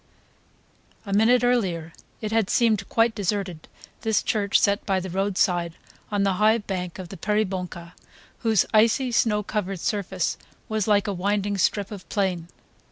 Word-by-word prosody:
A 200 - -4
moment 230 +4 +4
earlier 180 -10 0 0.3
it 215 -1 -3
had 225 -3 +1
seemed 220 -4 +2
quite 230 0 +3
deserted, 195 -5 -3 0.3
this 220 -2 +1
church 205 -2 +2
set 200 0 +2
by 190 -2 0
the 185 -1 -6
roadside 180 -3 0 0.4
on 205 -1 +1
the 195 -1 +2
high 220 +2 +5
bank 185 -5 -5
of 185 -2 -8
the 195 - -8
Peribonka, 185 -5 -2 0.5
whose 220 -4 +2
icy 230 +4 +3
snow 210 -3 +2
covered 195 -3 -3
surface 190 -3 -2 0.3
was 220 -2 -1
like 205 -1 +3
a 205 - -1
winding 200 +2 -1
strip 200 +2 +1
of 200 -3 -9
plain. 185 -5 -1
200 Hz, 155 wpm, -24 LUFS, 185-215 Hz, 0.5 s, high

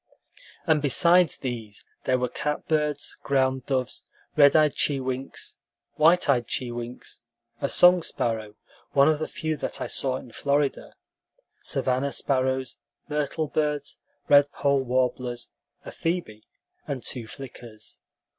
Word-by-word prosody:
And 160 -3 +3
besides 170 +3 +4
these 115 -5 -6 0.2
there 130 - +3
were 125 0 0
catbirds, 150 +2 -1
ground 130 -2 +1
doves, 130 -2 -1 0.3
red 145 -2 +6
eyed 155 -2 +5
chewinks, 130 -2 -2 0.4
white 165 +4 +4
eyed 125 -4 +2
chewinks, 120 -1 -5 0.4
a 140 - 0
song 180 0 +6
sparrow 110 -7 -2 0.4
(one 140 +1 +6
of 155 -1 +3
the 155 - -2
few 160 -4 -3
that - - -4
I - - -2
saw 130 -2 -1
in 125 - -11
Florida), 140 +2 -1 0.7
savanna 130 +2 -1
sparrows, 130 -2 0 0.3
myrtle 150 +1 -1
birds, 150 -1 -2 0.3
redpoll 140 -1 +4
warblers, 125 -1 -1 0.3
a - - -7
phoebe, 165 -11 -3 0.4
and 130 -4 -4
two 120 -4 -5
flickers. 120 -4 -10
135 Hz, 120 wpm, -26 LUFS, 125-150 Hz, 0.7 s, red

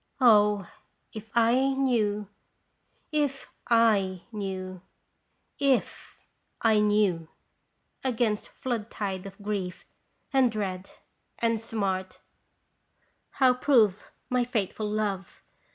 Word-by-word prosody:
O, 210 -6 +5 0.5
if 220 0 -9
I 250 +4 +4
knew, 220 -6 +1 0.8
if 290 -3 -1
/ - - -20
knew, 195 -3 0 0.8
if 275 -3 0 0.4
I 220 -2 +4
knew! 205 -6 +2 0.8
Against 230 -5 0
flood 230 -4 -4
tide 195 -2 -4
of 195 +1 -12
grief 195 -3 -4 0.5
and 260 -3 +4
dread 195 -3 -4 0.5
and 230 -1 0
smart 195 -4 -3 1.1
How 260 -2 +4
prove 230 -7 +2 0.2
my 250 -2 +1
faithful 215 -3 -2
love 205 -3 -3
215 Hz, 90 wpm, -27 LUFS, 195-240 Hz, 1.1 s, O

